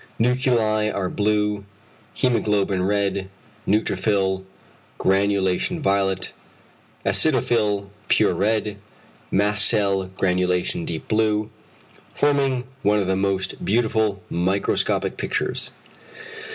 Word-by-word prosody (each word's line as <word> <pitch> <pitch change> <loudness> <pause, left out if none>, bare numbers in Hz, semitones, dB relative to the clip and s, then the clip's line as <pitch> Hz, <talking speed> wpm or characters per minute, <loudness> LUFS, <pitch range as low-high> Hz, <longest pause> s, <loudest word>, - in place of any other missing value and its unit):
Nuclei 115 -3 +2
are 95 -3 -2
blue, 105 -1 0 0.5
hæmoglobin 105 -6 +1
red, 100 -1 0 0.4
neutrophil 100 -2 +1 0.5
granulation 100 - +1
violet, 95 -6 0 0.7
acidophil 105 -9 +2 0.2
pure - - +3
red, 105 0 0 0.5
mast 105 +1 +2
cell 100 -2 +2
granulation 90 -2 0
deep 80 - -5
blue, 110 -1 +1 0.6
forming 140 -3 +1 0.2
one 105 +1 +3
of 100 - 0
the 95 +1 0
most 95 0 -1
beautiful 110 -2 +1
microscopic 95 +3 0
pictures. - - -1
100 Hz, 85 wpm, -22 LUFS, 95-110 Hz, 0.7 s, pure